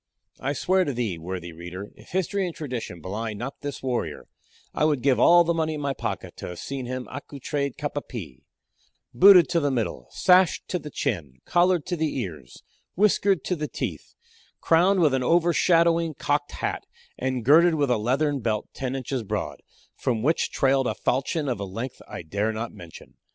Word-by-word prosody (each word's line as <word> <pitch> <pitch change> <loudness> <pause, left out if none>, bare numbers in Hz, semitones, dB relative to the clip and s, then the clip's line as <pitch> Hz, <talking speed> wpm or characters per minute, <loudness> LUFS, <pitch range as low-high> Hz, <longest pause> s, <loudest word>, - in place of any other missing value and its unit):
I 140 +2 -1
swear 185 +6 +2
to 140 - -2
thee, 110 -8 -2
worthy 90 0 -6
reader, 90 +4 -8
if 105 - -18
history 190 +1 0
and 170 - -6
tradition 125 - -5
belie 110 +6 -4
not 135 +7 -6
this 145 -2 -6
warrior, 120 - -2 0.5
I - - 0
would 150 -5 +2
give 135 -2 +3
all 175 0 +7
the 170 0 +1
money 160 -1 -1
in 150 - -5
my 140 -1 -1
pocket - - -5
to - - -6
have 90 - -7
seen 130 +6 -5
him 130 0 -4
accoutred 140 0 -4
cap - - -3
á - - -5
pie 65 - -8 0.7
booted 190 -2 +8
to 170 -1 +2
the 145 -3 +1
middle, 115 - -2
sashed 180 -1 +3
to 180 - -1
the 150 - -8
chin, 85 - -3
collared 175 -2 +3
to 180 - -2
the 160 -3 -1
ears, 85 - -7 0.3
whiskered 195 -3 +3
to 180 - -1
the 150 -2 -3
teeth, - - -5 0.4
crowned 180 +3 +4
with 150 -5 +4
an 130 - +1
overshadowing 170 +1 +3
cocked 145 +2 -1
hat, - - -3 0.3
and 130 -2 -2
girded 165 +5 +6
with 145 -4 +1
a 120 - +3
leathern 140 +6 +1
belt 110 -3 -2
ten 130 0 -3
inches 130 -1 -3
broad, 105 - -4 0.3
from 115 -3 -1
which 160 +5 +2
trailed 135 -2 +2
a 110 - -1
falchion, 140 +7 -1
of 125 -6 -1
a - - -3
length 115 +7 -6
that - - -17
I - - -7
dare 100 +7 -1
not 115 +1 -5
mention. 85 -2 -13
135 Hz, 195 wpm, -25 LUFS, 115-165 Hz, 0.7 s, booted